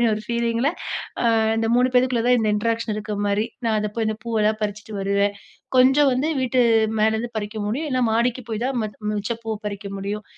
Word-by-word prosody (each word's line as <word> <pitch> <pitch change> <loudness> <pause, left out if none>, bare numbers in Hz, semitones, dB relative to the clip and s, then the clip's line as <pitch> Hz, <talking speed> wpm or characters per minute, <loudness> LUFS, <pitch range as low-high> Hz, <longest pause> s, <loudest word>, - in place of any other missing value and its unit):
அப்பிடீன்னு 230 -2 +3
ஒரு 215 - -6
பீலிங்ல, 235 +2 +1 0.5
அ - - 0 0.3
இந்த 225 0 0
3 250 +1 +4
பேருக்குள்ள 250 -2 +3
தான் 250 0 +5
இந்த 220 -2 +1
இன்ட்ராக்ஷன் 230 +1 -1
இருக்க 210 0 -4
மாரி. 205 +2 +1 0.2
நான் 220 -1 +2
அத 210 0 -1
போய் 225 - 0
இந்த 215 - -2
பூவெல்லாம் 215 -2 +1
பறிச்சுட்டு 210 +1 -4
வருவேன். 200 +1 +1 0.4
கொஞ்சம் 265 +3 +6
வந்து 265 +5 0
வீட்டு 255 0 +1 0.4
மேலேருந்து 220 +2 +1
பறிக்க 215 +1 -4
முடியும். 275 +9 -2
இல்ல 255 -1 +1
மாடிக்கு 235 +3 +1
போய் 220 +1 -3
தான் 265 0 -1
ம 215 - -1 0.2
மிச்சப் 215 +3 -3
பூவை 220 -1 -2
பறிக்க 200 -1 -5
முடியும். 205 +2 -4
225 Hz, 195 wpm, -23 LUFS, 210-245 Hz, 0.5 s, கொஞ்சம்